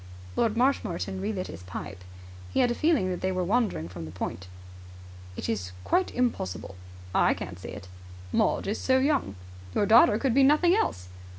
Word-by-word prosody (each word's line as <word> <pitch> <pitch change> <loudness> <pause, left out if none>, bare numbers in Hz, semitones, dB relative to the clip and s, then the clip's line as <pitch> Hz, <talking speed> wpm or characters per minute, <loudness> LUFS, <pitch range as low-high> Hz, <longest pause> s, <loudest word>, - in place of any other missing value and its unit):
Lord 225 -1 +1
Marshmoreton 195 -7 0
relit 195 -2 -2
his 85 - -9
pipe. 90 0 -8 0.5
He - - +1
had 245 - +3
a - - +2
feeling 280 - +2
that 180 - -4
they 185 - 0
were 185 -1 -1
wandering 200 - 0
from 85 -2 -8
the 80 - -8
point. 90 +1 -5 0.9
"It - - -4
is 90 -5 -3
quite 370 0 +1
impossible." 95 - -2 0.4
"I - - +3
can't 90 - -7
see - - -8
it." 100 -2 -9 0.4
"Maud - - +1
is 205 +3 -2
so 260 0 +3
young." 270 - +1 0.4
"Your 205 - +3
daughter 220 0 +6
could 260 0 0
be 275 - +5
nothing 305 +6 +5
else." 90 - -1
195 Hz, 180 wpm, -27 LUFS, -, 0.9 s, daughter